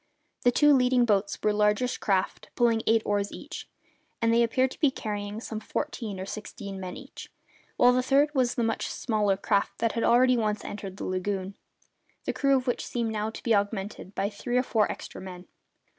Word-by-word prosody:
The 245 - +4
two 295 +3 +5
leading 250 -2 +4
boats 200 -2 +1
were 210 - +3
largish 210 +4 +1
craft, 190 -2 -1
pulling 230 -2 +3
eight 225 0 +4
oars 205 -1 0
each, 305 +4 -8 0.5
and 230 -1 +2
they 235 - +4
appeared 255 +3 +2
to - - -11
be 295 - +4
carrying 210 -4 -4
some 225 -1 -5
fourteen 215 -2 -4
or 190 - -4
sixteen 200 -1 -7
men 185 -1 -6
each, - - -11 0.5
while 245 0 +6
the 255 - +3
third 280 +3 +3
was 255 -4 +1
the 240 - 0
much 225 0 -1
smaller 210 -4 0
craft 200 0 0
that 230 -1 +1
had 230 - -2
already 250 +1 +5
once 215 -2 -1
entered 195 -2 -6
the - - -5
lagoon, 190 +1 -2 0.7
the - - -1
crew 275 -1 +3
of 255 - -3
which 245 - -1
seemed 235 -2 -2
now 215 0 -2
to 220 - -9
be 230 - +2
augmented 200 -1 -2
by 195 - 0
three 240 +4 -2
or 250 - +3
four 220 -4 +1
extra - - -8
men. 180 -1 -9
220 Hz, 200 wpm, -27 LUFS, 200-245 Hz, 0.7 s, while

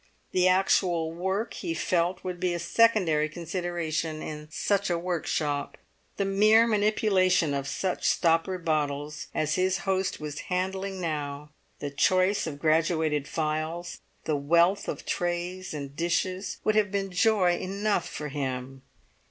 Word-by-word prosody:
The 185 0 +3
actual 185 -3 +2
work, 190 +6 -2
he 165 - -4
felt, 175 +2 0
would 180 -1 -4
be 180 -1 0
a - - -1
secondary 170 -5 +3
consideration 165 -2 -3
in 150 0 -6
such 200 +5 0
a 175 - +1
workshop; 160 -4 -2 0.4
the 200 - 0
mere 215 +3 +5
manipulation 205 -7 +2
of 140 -1 -2
such 190 -1 -1
stoppered 170 +1 +1
bottles 150 -1 -1
as 155 0 +1
his 185 +1 +1
host 190 -1 0
was 150 -1 -5
handling 190 +1 -2
now, 150 -3 -4 0.3
the 145 - -5
choice 185 +7 +2
of 145 -3 -5
graduated 155 -1 +1
phials, 160 +2 -3 0.2
the 155 - 0
wealth 170 +7 +3
of - - -5
trays 175 +1 -2
and 140 -2 -6
dishes, 185 +4 -1
would 215 - +2
have 210 -2 +2
been 195 -1 -2
joy 185 -1 +3
enough 200 0 -1
for 150 -1 -5
him. 135 -2 -4
175 Hz, 140 wpm, -27 LUFS, 155-190 Hz, 0.4 s, mere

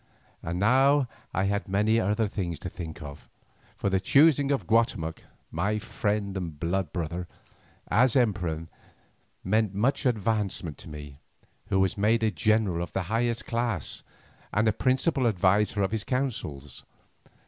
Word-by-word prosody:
And 85 +1 -3
now 135 +7 +4 0.2
I 95 - 0
had 100 +2 -1
many 105 +4 +2
other 105 +1 +1
things 90 -5 -3
to 90 - -4
think 80 -2 -7
of, 70 0 -10 0.5
for 100 - -1
the 95 - +3
choosing 140 +6 +4
of 135 -10 0
Guatemoc—my 105 0 -1
friend 105 -2 -2
and 85 -6 -5
blood 85 +3 -1
brother—as 90 +7 -2
emperor 90 - +1 0.8
meant 105 0 +1
much 130 +6 +1
advancement 105 -8 -1
to - - -10
me, 75 -2 -9 0.5
who 100 -2 +1
was 95 +1 +1
made 110 +3 +3
a 110 - +3
general 100 0 +1
of 85 - -5
the 95 - -1
highest 115 0 0
class, 115 - -2 0.5
and 105 +2 +2
a 110 - +3
principal 130 +3 +2
adviser 100 +1 +2
in 95 - 0
his 110 -2 -1
councils. 105 - -3
105 Hz, 140 wpm, -27 LUFS, 90-115 Hz, 0.8 s, now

